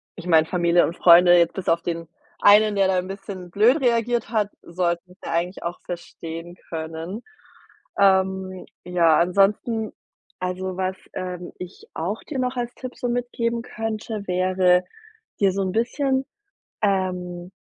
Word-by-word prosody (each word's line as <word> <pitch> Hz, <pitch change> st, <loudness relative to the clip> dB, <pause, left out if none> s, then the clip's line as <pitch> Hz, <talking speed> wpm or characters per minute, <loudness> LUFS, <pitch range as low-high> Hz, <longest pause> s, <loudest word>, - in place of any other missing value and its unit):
ich 175 Hz, -1 st, -9 dB
meine, 160 Hz, -2 st, +5 dB
Familie 175 Hz, -1 st, +3 dB
und 170 Hz, -, -5 dB
Freunde 175 Hz, 0 st, +7 dB
jetzt 170 Hz, -1 st, +3 dB
bis 190 Hz, -, -6 dB
auf 165 Hz, +1 st, +2 dB
den 165 Hz, -1 st, -4 dB, 0.3 s
einen, 210 Hz, +1 st, +6 dB
der 195 Hz, -1 st, +4 dB
da 185 Hz, -1 st, +2 dB
'n 180 Hz, -, -5 dB
bisschen 195 Hz, -2 st, -8 dB
blöd 240 Hz, -, +4 dB
reagiert 235 Hz, -2 st, +1 dB
hat, 210 Hz, -3 st, +1 dB
sollten's 175 Hz, +1 st, -3 dB
ja -, -, -4 dB
eigentlich 175 Hz, +3 st, -2 dB
auch 170 Hz, +1 st, -4 dB
verstehen 170 Hz, 0 st, -7 dB
können. 165 Hz, +5 st, -5 dB, 0.8 s
Ähm, 190 Hz, -1 st, +2 dB, 0.2 s
ja, 170 Hz, -3 st, +4 dB
ansonsten, 205 Hz, +5 st, +2 dB, 0.5 s
also, 185 Hz, 0 st, -3 dB
was, 190 Hz, 0 st, -1 dB, 0.2 s
ähm, 180 Hz, -1 st, -5 dB
ich 180 Hz, 0 st, -9 dB
auch 185 Hz, +7 st, -3 dB
dir 280 Hz, -4 st, -5 dB
noch 255 Hz, 0 st, -1 dB
als 245 Hz, 0 st, -3 dB
Tipp 255 Hz, -1 st, -8 dB
so 245 Hz, -, -2 dB
mitgeben 235 Hz, -1 st, -1 dB
könnte, 220 Hz, -2 st, -4 dB
wäre, 185 Hz, 0 st, +3 dB, 0.6 s
dir 195 Hz, -, +5 dB
so 195 Hz, -, -1 dB
'n 185 Hz, -, -1 dB
bisschen, 265 Hz, +3 st, 0 dB, 0.6 s
ähm, 180 Hz, -3 st, -1 dB
185 Hz, 150 wpm, -23 LUFS, 175-215 Hz, 0.8 s, Freunde